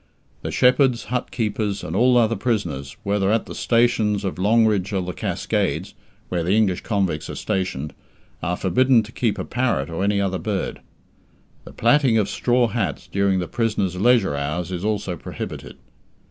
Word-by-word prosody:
The - - -4
shepherds, 125 -1 +3
hut 125 - -1
keepers, 105 -3 -2
and 80 - -4
all 125 +3 +4
other 115 -1 +3
prisoners, 90 - -2
whether 100 0 +1
at 110 0 +1
the - - -8
stations 110 -4 +1
of 95 -1 -3
Longridge 105 -1 +3
or 95 - +1
the 90 0 -4
Cascades 75 - -2 0.4
(where 90 -1 -1
the 90 +5 +2
English 100 -5 +2
convicts 95 -8 -1
are - - -5
stationed) 95 -8 -2 0.5
are 85 +2 -1
forbidden 120 +5 +3
to 110 - -11
keep 115 -3 -1
a - - -4
parrot 110 - -1
or 85 +4 -2
any 100 0 +2
other 95 -2 -1
bird. 105 -3 -3 0.8
The - - -10
plaiting 120 -1 +3
of 105 -2 +1
straw 120 -1 +2
hats - - -2
during 100 -1 +2
the 90 -2 -2
prisoners' 105 -5 -1
leisure 105 -5 +3
hours 75 +5 -3
is 90 0 -4
also 100 -4 -1
prohibited. - - -7
100 Hz, 170 wpm, -22 LUFS, 90-115 Hz, 0.8 s, all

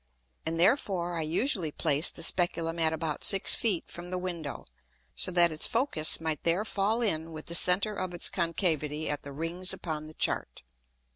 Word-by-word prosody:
And 165 +1 -2
therefore 175 -4 +1
I 165 - -2
usually 175 - -1
placed 150 0 +1
the 165 - -3
Speculum 170 -1 0
at 160 -1 +2
about 160 -1 -4
six 195 -1 +7
Feet 205 -8 0
from 175 +1 -10
the 185 - -3
Window; 175 -5 -6 0.5
so - - 0
that 175 -2 +4
its 155 - +2
Focus 230 - +2
might 160 -2 -4
there 175 +5 0
fall 220 +3 -1
in 165 -6 -1
with 155 -1 -8
the 170 - -6
center 180 +5 +5
of 185 -2 -5
its 175 - -2
concavity 160 -4 -2
at 145 - -3
the 140 - -7
Rings 165 +5 -3
upon 155 -2 -6
the 155 - -13
Chart. - - -2
170 Hz, 185 wpm, -28 LUFS, 160-185 Hz, 0.5 s, six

